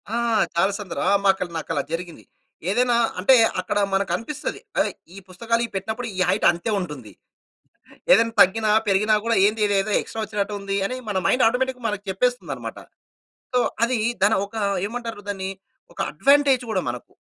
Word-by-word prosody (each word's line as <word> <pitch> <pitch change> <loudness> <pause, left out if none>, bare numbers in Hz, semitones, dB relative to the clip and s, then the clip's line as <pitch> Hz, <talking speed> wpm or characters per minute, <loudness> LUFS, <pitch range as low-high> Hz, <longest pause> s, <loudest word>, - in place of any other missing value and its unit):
ఆ! - - 0 0.4
చాలా 190 +4 +3
సందర్ 200 -4 -6
ఆ! - - +3
మాకల 190 -2 +2
నాకలా 160 -2 -2
జరిగింది. 170 0 -5 0.5
ఏదైనా 245 +4 +2 0.2
అంటే 230 +8 +6 0.3
అక్కడ 195 - -3 0.2
మనకనిపిస్తది. 230 - -2 0.2
ఏయ్! - - -3 0.2
ఈ - - -11
పుస్తకాలు 230 +6 -1
ఇవి - - -11
పెట్టినప్పుడు 220 +5 -3
ఈ - - -3
హైట్ 195 +3 +1
అంతే 175 +6 -4
ఉంటుంది. 150 - -7 1.0
ఏదైనా 230 0 +5
తగ్గిన, 215 +4 +4 0.2
పెరిగినా 210 +2 +3
కూడా 230 0 +2
ఏందిదేదో 210 -1 +1
ఎక్స్ట్రా 225 - -6
వచ్చినట్టు 210 -1 -3
ఉంది, 200 0 -3
అని 255 - -4
మన 195 - -1
మైండ్ 250 - +3
ఆటోమేటిక్‌గా 250 +1 -1
మనకు 210 -2 -3
చెప్పేస్తుందన్నమాట. 245 +6 -2 0.8
సో, 250 - +3 0.3
అది 240 -1 -1 0.2
దన 210 +2 +5
ఒక 200 - -15 0.3
ఏమంటారు? 230 -1 -6
దాన్ని 190 -1 -3 0.4
ఒక - - -15
అడ్వాంటేజ్ 275 -2 +3
కూడా - - 0
మనకు. - - -7
210 Hz, 155 wpm, -23 LUFS, 190-235 Hz, 1.0 s, అంటే